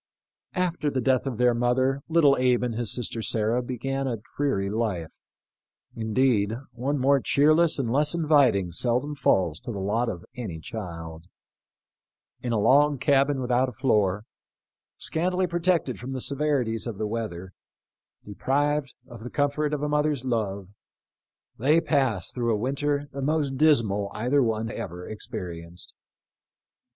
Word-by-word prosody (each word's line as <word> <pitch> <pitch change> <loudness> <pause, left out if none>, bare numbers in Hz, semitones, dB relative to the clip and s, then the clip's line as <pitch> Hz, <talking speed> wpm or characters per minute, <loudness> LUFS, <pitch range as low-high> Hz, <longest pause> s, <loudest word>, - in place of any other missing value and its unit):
After 175 -5 0
the 135 - -1
death 130 +1 +1
of 125 -5 -3
their 125 0 +4
mother 130 +3 +1
little 155 -4 +5
Abe 125 -1 +2
and 120 -2 -1
his 115 -2 -2
sister 120 -1 -2
Sarah 110 +2 +1
began 135 +2 -3
a 120 -3 -2 0.2
dreary 135 -9 0
life 100 -6 -3 0.4
— - - -68 0.3
indeed, 110 -1 +1
one 130 +5 -2
more 140 +1 +3
cheerless 155 +5 +3
and 125 -5 -1
less 150 +3 +2
inviting 140 - +3
seldom 125 - 0
falls 90 - +1
to - - -6
the 105 - -5
lot 110 +5 0
of 85 0 -6
any 105 -11 -5
child. 85 -4 -7 1.2
In 120 - -3
a 115 - +1
log 140 +6 +4
cabin 140 0 +2
without 125 +1 +1
a - - -10
floor, 105 -5 +1 0.7
scantily 180 +3 -1
protected 175 -6 0
from 130 +2 -6
the 130 - -3
severities 135 -6 -1
of 115 -4 -5
the 110 - -2
weather, 105 -5 -5 0.7
deprived 140 +6 -1
of 120 -2 -11
the 120 +3 -7
comfort 145 +2 0
of 150 -1 -2
a - - +1
mother's 150 -3 0
love, 100 -6 -2 0.9
they 150 +7 +4
passed 130 - 0
through 120 -2 0
a 110 - +1
winter 140 +4 -1
the 140 - -6
most 145 -1 0
dismal 115 -10 +3
either 125 +6 +2
one 115 -2 -1
ever 90 -2 -6
experienced. 85 -4 -7
125 Hz, 150 wpm, -26 LUFS, 110-145 Hz, 1.2 s, little